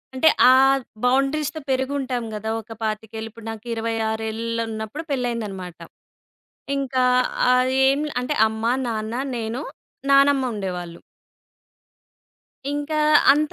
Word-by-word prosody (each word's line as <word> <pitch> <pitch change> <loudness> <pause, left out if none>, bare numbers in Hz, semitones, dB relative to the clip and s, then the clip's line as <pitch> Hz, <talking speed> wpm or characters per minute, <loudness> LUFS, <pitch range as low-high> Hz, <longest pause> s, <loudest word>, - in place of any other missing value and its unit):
అంటే, 315 +5 +5 0.2
ఆ - - +7 0.5
బౌండరీస్‌తో 275 +4 +1
పెరిగుంటాం 265 -2 -1
గదా! 215 +1 -4
ఒక 225 +1 -11
25ఏళ్లు 220 +1 -4
ఇప్పుడు 225 0 -13
నాకు 225 +1 -10
ఇరవై 225 0 -2
ఆరేళ్ళున్నప్పుడు 225 +3 -3
పెళ్ళయిందన్నమాట. 215 -9 -3 1.0
ఇంకా 260 -2 0 0.5
అది 255 +1 +2
ఏం 275 +2 +1 0.2
అంటే 250 +4 -2
అమ్మ, 225 +3 -1
నాన్న, 220 0 -3 0.2
నేను, 230 +4 -3 0.5
నానమ్మ 275 0 +5
ఉండేవాళ్ళు. 180 -4 -5 1.7
ఇంకా 290 +1 -2 0.3
అంత 300 +1 0
235 Hz, 100 wpm, -22 LUFS, 220-270 Hz, 1.7 s, ఆ